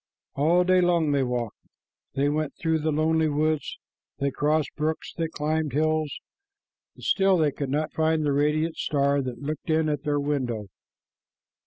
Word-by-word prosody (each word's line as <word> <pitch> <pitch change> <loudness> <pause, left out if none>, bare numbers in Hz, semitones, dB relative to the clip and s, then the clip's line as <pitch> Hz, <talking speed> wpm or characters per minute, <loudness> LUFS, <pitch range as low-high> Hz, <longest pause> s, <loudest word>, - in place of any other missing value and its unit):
All 165 +6 +3
day 185 0 +4
long 170 -4 +2
they 140 -1 +2
walked. 125 -3 -2 0.6
They 140 +1 +2
went 150 0 -1
through 160 -1 0
the 155 +1 0
lonely 160 +1 +2
woods, 155 +1 -1 0.4
they 140 0 0
crossed 150 +2 0
brooks, 155 +1 -2
they 165 -1 -1
climbed 155 -2 -2
hills, 155 0 +1 0.8
and - - -15
still 195 -1 +3
they 155 -3 +2
could 140 -1 -4
not 150 +3 -1
find 160 -1 +1
the 145 - +1
radiant 150 +3 +1
star 140 -1 +1
that 130 -2 -4
had 140 - -10
looked 155 +1 -4
in 160 0 +2
at 150 -2 -1
their 145 0 0
window. 125 -8 -2
150 Hz, 170 wpm, -26 LUFS, 140-160 Hz, 0.8 s, day